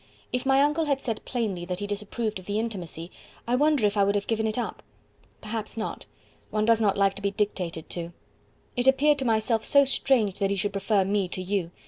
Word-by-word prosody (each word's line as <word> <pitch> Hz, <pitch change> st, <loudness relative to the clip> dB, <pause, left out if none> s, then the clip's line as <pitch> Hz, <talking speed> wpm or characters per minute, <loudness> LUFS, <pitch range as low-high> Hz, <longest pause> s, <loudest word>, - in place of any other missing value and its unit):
If 250 Hz, +1 st, -1 dB
my 270 Hz, +1 st, +5 dB
uncle 300 Hz, +2 st, +1 dB
had 280 Hz, -2 st, +1 dB
said 230 Hz, -5 st, -4 dB
plainly 215 Hz, -8 st, -2 dB
that 180 Hz, 0 st, -4 dB
he 205 Hz, -, -3 dB
disapproved 210 Hz, +1 st, -2 dB
of 185 Hz, -, -15 dB
the 205 Hz, +1 st, -1 dB
intimacy, 185 Hz, -7 st, -4 dB, 0.4 s
I 240 Hz, -, +2 dB
wonder 290 Hz, -3 st, +3 dB
if 205 Hz, 0 st, +1 dB
I 200 Hz, -, +4 dB
would 200 Hz, +1 st, +2 dB
have 200 Hz, -, 0 dB
given 220 Hz, -1 st, 0 dB
it 215 Hz, -, -2 dB
up? 245 Hz, -, -3 dB, 0.6 s
Perhaps 215 Hz, +1 st, -5 dB
not 220 Hz, -, -4 dB, 0.4 s
one 215 Hz, 0 st, 0 dB
does 225 Hz, 0 st, +4 dB
not 200 Hz, -2 st, +2 dB
like 195 Hz, -1 st, +3 dB
to -, -, -7 dB
be 200 Hz, -, +1 dB
dictated 185 Hz, -5 st, -2 dB
to. 170 Hz, -1 st, -5 dB, 0.6 s
It 245 Hz, 0 st, 0 dB
appeared 285 Hz, +2 st, +4 dB
to 265 Hz, -, -1 dB
myself 220 Hz, 0 st, +1 dB
so 280 Hz, -1 st, +5 dB
strange 245 Hz, -7 st, +2 dB
that 195 Hz, -1 st, +1 dB
he 200 Hz, -, +1 dB
should 205 Hz, +1 st, -1 dB
prefer 200 Hz, 0 st, +1 dB
me 200 Hz, -1 st, +1 dB
to 185 Hz, -, -5 dB
you. 185 Hz, -2 st, -1 dB
215 Hz, 220 wpm, -26 LUFS, 195-245 Hz, 0.6 s, my